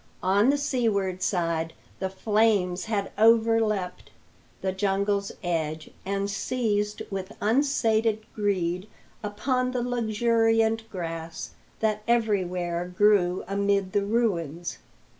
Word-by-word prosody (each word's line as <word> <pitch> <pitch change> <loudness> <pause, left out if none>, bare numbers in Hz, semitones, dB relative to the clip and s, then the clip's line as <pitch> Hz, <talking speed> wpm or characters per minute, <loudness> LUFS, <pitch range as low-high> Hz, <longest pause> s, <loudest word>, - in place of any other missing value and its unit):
On 200 +6 +4
the 285 - +3
seaward 220 -10 0
side 165 -3 0 0.3
the 190 - -1
flames 200 -2 +1
had 210 -3 -2
overleapt 220 -4 +3 0.5
the 190 - +1
jungle's 200 +1 0
edge, 160 -3 -2
and 200 +1 -1
seized 210 0 -1
with 195 +1 -5
unsated 225 -3 +2
greed 185 -3 -1 0.3
upon 250 +5 -1
the 245 -1 0
luxuriant 225 -1 +1
grass 165 -3 -5 0.3
that 215 -1 +1
everywhere 180 -7 0
grew 195 -4 +4
amid 200 -1 +1
the 205 - +2
ruins. 175 -7 -1
205 Hz, 105 wpm, -26 LUFS, 185-225 Hz, 0.5 s, On